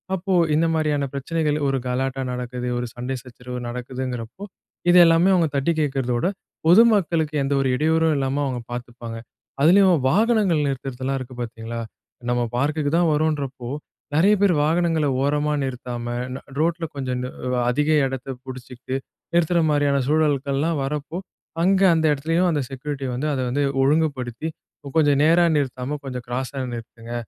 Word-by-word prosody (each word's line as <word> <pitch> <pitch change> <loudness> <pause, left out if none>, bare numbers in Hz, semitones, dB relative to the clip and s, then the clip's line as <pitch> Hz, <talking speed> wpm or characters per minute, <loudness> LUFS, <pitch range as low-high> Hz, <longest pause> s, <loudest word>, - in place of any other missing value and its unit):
அப்போ 190 +1 -2 0.2
இந்த 160 +2 +3
மாரியான 150 -3 +1
பிரச்சனைகள் 150 +2 -1
ஒரு 135 0 +1
கலாட்டா 130 +1 -1
நடக்குது. 125 0 -4
ஒரு 120 0 -2
சண்டை 125 +2 -3
சச்சரவு 125 0 -8
நடக்குதுங்கிறப்போ, 125 - -5 0.5
இது 175 - +7
எல்லாமே 165 +3 +4
அவங்க 170 -3 +3
தட்டி 140 +4 +2
கேக்றதோட, 135 -4 0 0.4
பொதுமக்களுக்கு 175 -6 +4
எந்த 135 +1 0
ஒரு 135 - +1
இடையூறும் 160 +3 +2
இல்லாம 135 +1 0
அவங்க 130 -3 -2
பார்த்துப்பாங்க. 120 -1 -6 0.4
அதிலயும் 185 +4 +6
வாகனங்கள் 205 - +3
நிறுத்துறதெல்லாம் 135 0 -3
இருக்கு 130 0 -8
பார்த்தீங்களா? 115 0 -5 0.5
நம்ம 120 0 +1 0.2
பார்க்குக்கு 145 +2 0
தான் 170 -1 +3
வரோம்ன்றப்போ. 140 -5 -1 0.5
நெறைய 190 +7 +5
பேரு 195 -4 +4
வாகனங்கள 165 0 +1 0.2
ஓரமா 150 +1 +1
நிறுத்தாம 125 -2 -5 0.3
ந - - -5 0.2
ரோட்டுல 165 +1 +1
கொஞ்சம் 130 -2 -2
நு 125 - -4 0.4
அதிக 150 +5 +1 0.2
எடத்தை 135 0 -4
புடிச்சிகிட்டு 130 0 -7 0.4
நிறுத்துற 170 0 +3
மாதிரியான 145 -2 +2
சூழல்கள்லாம் 145 +1 +1
வர்றப்போ, 150 +4 -4 0.5
அங்க 190 +1 +3
அந்த 160 -1 +1
இடத்துலேயும் 165 +5 +1
அந்த 150 -3 0
செக்யூரிட்டி 135 0 -5
வந்து, 130 +5 -2
அதை 130 - -1
வந்து 140 +4 0 0.2
ஒழுங்குபடுத்தி 140 -2 0 0.5
கொஞ்சம் 145 -3 +4
நேரா 165 +3 +5
நிறுத்தாம 135 0 -2
கொஞ்சம் 125 -2 -5
கிராஸா 130 +3 -3 0.2
நிறுத்துங்க. 115 0 -9
140 Hz, 140 wpm, -23 LUFS, 125-160 Hz, 0.5 s, இது